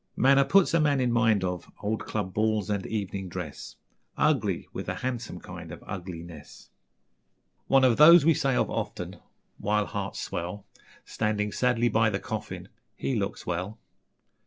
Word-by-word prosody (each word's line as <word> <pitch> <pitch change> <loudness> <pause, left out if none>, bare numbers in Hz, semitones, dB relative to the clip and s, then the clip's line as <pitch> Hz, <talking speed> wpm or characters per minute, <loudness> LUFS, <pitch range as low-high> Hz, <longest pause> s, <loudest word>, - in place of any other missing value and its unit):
Manner 135 +1 +5
puts 195 +1 +4
a 165 - +4
man 145 -3 +2
in 125 -2 +1
mind 110 -4 +3
of 90 -1 -4
Old 110 +1 -2
club 100 -4 -3
balls 110 -1 0
and 100 -2 -2
evening 100 -3 -4
dress, 85 -5 -7 0.4
Ugly - - +1
with - - -5
a - - -2
handsome 120 -7 -4
kind 90 -2 -9
of 80 - -10
Ugliness...... 85 -4 -9 1.0
One 135 -1 +5
of 125 -3 +4
those 160 +1 +8
we 165 - +6
say 135 -3 0
of - - +2
often, - - -5 0.4
While 105 0 +1
hearts - - -4
swell, 90 +4 -5 0.4
Standing 105 -1 -1
sadly 120 0 +2
by 115 -1 +3
the 100 -2 -2
coffin: 110 +1 -6 0.3
'He 70 - -2
looks - - -3
well.'... 90 +5 -3
105 Hz, 160 wpm, -27 LUFS, 90-125 Hz, 1.0 s, those